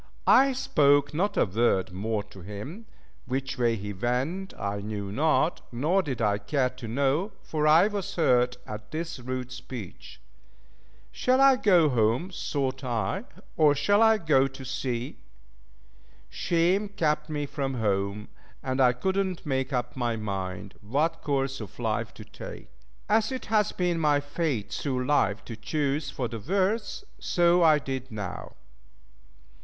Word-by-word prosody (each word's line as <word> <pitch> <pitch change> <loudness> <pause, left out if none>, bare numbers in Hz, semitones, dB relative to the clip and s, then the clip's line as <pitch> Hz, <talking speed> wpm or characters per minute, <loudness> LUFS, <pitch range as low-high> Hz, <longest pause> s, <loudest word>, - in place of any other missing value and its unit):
I 270 0 +6
spoke 145 - +3
not 200 +6 0
a - - +4
word 95 -2 +1
more 105 +3 -2
to 100 -2 -14
him; 105 - -8 0.4
which 130 0 -3
way 120 -2 +3
he 105 -1 -5
went 130 - -2
I 100 0 -2
knew 100 -1 -5
not, 155 - +1
nor 155 +11 +2
did 130 -8 -3
I 105 -1 +2
care 125 +4 0
to 125 -2 -9
know, 140 - 0
for 155 -1 0
I 160 +5 +7
was 205 -3 -4
hurt 125 -6 +3
at 105 0 -8
this 160 0 -4
rude 130 0 -4
speech. 120 - -9 0.9
Shall 255 +1 +2
I 270 -1 +7
go 180 -9 +4
home 125 - +1
thought 135 -6 -2
I, 115 -6 -2 0.3
or 150 -2 +5
shall 205 +8 +3
I 220 -1 +6
go 150 -8 +3
to 135 0 -10
sea? 125 -1 -3 1.1
Shame 180 +4 +1
kept 155 -5 0
me 145 -1 -2
from 135 -1 -3
home, 100 -2 -1 0.3
and 130 0 0
I 125 -1 +5
could 190 +10 -1
not 185 -3 -5
make 135 -1 -1
up 125 -2 -2
my 120 -3 -1
mind 95 -3 -4
what 140 +11 0
course 135 -3 -1
of 105 - -9
life - - -1
to - - -10
take. - - -10 0.4
As 220 +2 +2
it 260 - -4
has 210 -1 +3
been 175 -2 0
my 150 -2 +3
fate 145 -6 -2
through 130 -3 -2
life 110 -8 +1
to 115 - -7
choose 140 +5 -1
for 125 - -3
the 115 0 -6
worst, 195 - -1 0.2
so 175 0 +3
I 155 -2 +6
did 135 -2 -5
now. 105 -4 -6
135 Hz, 155 wpm, -27 LUFS, 115-165 Hz, 1.1 s, I